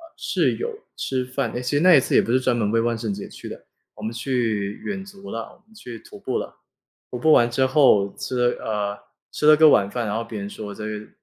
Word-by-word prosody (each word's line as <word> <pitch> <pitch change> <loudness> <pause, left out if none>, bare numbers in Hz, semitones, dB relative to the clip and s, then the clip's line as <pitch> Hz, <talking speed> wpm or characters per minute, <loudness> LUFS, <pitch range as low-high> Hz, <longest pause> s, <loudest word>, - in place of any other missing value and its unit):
是 - - 0
有 470 - -3 0.2
吃 130 -1 -2
饭， 130 -2 -2
诶 120 - -3
其 125 +3 -1
实 145 - +4
那 180 -2 +7
一 - - +7
次 - - -3
也 - - +6
不 115 - -3
是 130 - +4
专 130 -1 +1
门 105 -3 0
为 115 - +2
万 120 0 0
圣 110 -2 -3
节 100 - -6
去 - - -10
的， - - -10 0.3
我 105 - -11
们 110 +2 -3
去 115 -5 -1
远 195 -2 -4
足 195 0 -11
了， 115 - -3 0.2
我 - - -28
们 220 - -24
去 120 - -9
徒 - - -14
步 - - -2
了。 - - -6 0.5
徒 125 - -5
步 155 +6 +3
完 120 -4 +5
之 130 +3 +1
后 130 -8 +4
吃 125 -2 0
了 - - -11
呃， 105 -1 -2 0.3
吃 150 - 0
了 155 0 +8
个 160 0 +7
晚 100 -6 +4
饭， 120 +2 -3
然 105 - -2
后 115 - -1
别 115 -2 -7
人 100 - -5
说 105 -1 -8
这 105 - -6
个 105 0 -6
120 Hz, 285 characters per minute, -23 LUFS, 105-135 Hz, 0.5 s, 了